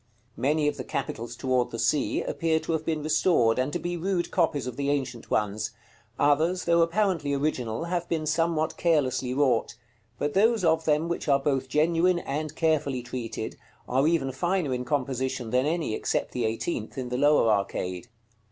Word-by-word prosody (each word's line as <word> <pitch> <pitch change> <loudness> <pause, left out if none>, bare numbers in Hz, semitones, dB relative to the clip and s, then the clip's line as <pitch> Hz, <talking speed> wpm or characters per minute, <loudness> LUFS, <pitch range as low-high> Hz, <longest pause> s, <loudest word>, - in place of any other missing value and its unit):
Many 150 +2 +1
of 150 - -1
the - - -4
capitals 115 +1 -4
toward 130 0 0
the 115 - -6
Sea 145 +5 +1
appear 160 -1 0
to - - -4
have 160 -1 0
been 155 -2 -2
restored, 150 -7 +3
and 130 +3 0
to - - -1
be 175 0 -3
rude 180 0 -1
copies 145 -5 +1
of 125 -2 -5
the 140 +1 -1
ancient 130 -5 -2
ones; 105 +1 -1 0.4
others, 160 +6 +2
though 170 0 +4
apparently 165 -5 +1
original, 130 -4 -1
have 175 0 -2
been 160 -2 -1
somewhat 160 0 0
carelessly 135 -6 +1
wrought; 130 -3 +1 0.4
but 145 +4 -2
those 220 +1 +3
of 160 -1 +2
them, 155 +1 +2
which 170 -1 -3
are 140 -2 +5
both 135 -2 -1
genuine 165 +5 +3
and 155 -1 -4
carefully 145 -6 0
treated, 115 -3 -5 0.3
are 135 +4 +2
even 155 -5 +1
finer 175 0 0
in 125 0 -3
composition 130 -2 -2
than 130 +3 +2
any, 160 -7 -1
except - - -1
the 120 -2 -1
eighteenth, 110 +2 -3
in 125 -2 -3
the 125 - -2
lower 145 -4 +4
arcade. 100 -1 -2
145 Hz, 180 wpm, -27 LUFS, 125-165 Hz, 0.4 s, are